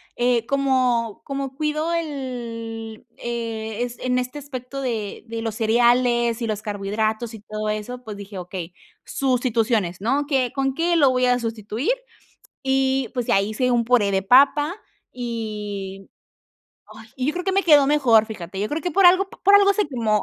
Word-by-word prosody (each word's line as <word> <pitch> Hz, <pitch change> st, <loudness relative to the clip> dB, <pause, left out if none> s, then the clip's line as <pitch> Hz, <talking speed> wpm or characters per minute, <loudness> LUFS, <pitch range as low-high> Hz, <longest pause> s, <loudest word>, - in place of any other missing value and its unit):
eh, 240 Hz, -1 st, +1 dB
como 255 Hz, -5 st, +1 dB
como 275 Hz, -1 st, -4 dB
cuido 305 Hz, +2 st, -1 dB
el 235 Hz, -8 st, -5 dB
eh, 230 Hz, -1 st, -4 dB
es 245 Hz, -1 st, -6 dB
en 250 Hz, 0 st, 0 dB
este 250 Hz, +3 st, -3 dB
aspecto 275 Hz, -1 st, -7 dB
de 225 Hz, -6 st, -3 dB
de 225 Hz, 0 st, -5 dB
los 225 Hz, -2 st, -3 dB
cereales 240 Hz, +1 st, +2 dB
y 230 Hz, -, -1 dB
los 215 Hz, -1 st, -2 dB
carbohidratos, 215 Hz, +2 st, -2 dB
y 220 Hz, -, -10 dB
todo 215 Hz, 0 st, -5 dB
eso, 215 Hz, +4 st, -4 dB
pues 215 Hz, -3 st, -7 dB
dije: 200 Hz, 0 st, -9 dB
"Okey, 180 Hz, -1 st, -6 dB, 0.3 s
sustituciones, 230 Hz, -8 st, 0 dB
¿no? 270 Hz, +8 st, 0 dB
¿Qué 265 Hz, -4 st, 0 dB
con 270 Hz, -1 st, 0 dB
qué 340 Hz, +4 st, +1 dB
lo 290 Hz, -5 st, +5 dB
voy 255 Hz, 0 st, +2 dB
a 250 Hz, 0 st, +3 dB
sustituir?". 225 Hz, -, -2 dB, 0.7 s
Y, 265 Hz, -2 st, +1 dB
pues 245 Hz, -3 st, -2 dB
ya 195 Hz, -, +3 dB
hice 220 Hz, +5 st, 0 dB
un 240 Hz, -1 st, +2 dB
puré 230 Hz, -4 st, +3 dB
de 190 Hz, -1 st, +1 dB
papa 280 Hz, -, +4 dB, 0.4 s
y 210 Hz, -5 st, -5 dB, 0.8 s
ay, 215 Hz, +1 st, -13 dB
y 255 Hz, -1 st, -2 dB
yo 300 Hz, -, +1 dB
creo 355 Hz, +2 st, -4 dB
que 385 Hz, -, 0 dB
me 390 Hz, +1 st, +2 dB
quedó 295 Hz, -5 st, +6 dB
mejor, 250 Hz, -7 st, +4 dB
fíjate, 190 Hz, -4 st, -7 dB
yo 205 Hz, +2 st, -1 dB
creo 305 Hz, +2 st, -3 dB
que 360 Hz, -, -1 dB
por 375 Hz, +3 st, +5 dB
algo 370 Hz, +2 st, +5 dB
p -, -, -14 dB
por 400 Hz, +1 st, +6 dB
algo 400 Hz, 0 st, +6 dB
se 420 Hz, -2 st, +1 dB
quemó, 225 Hz, -6 st, 0 dB
240 Hz, 180 wpm, -22 LUFS, 220-270 Hz, 0.8 s, quedó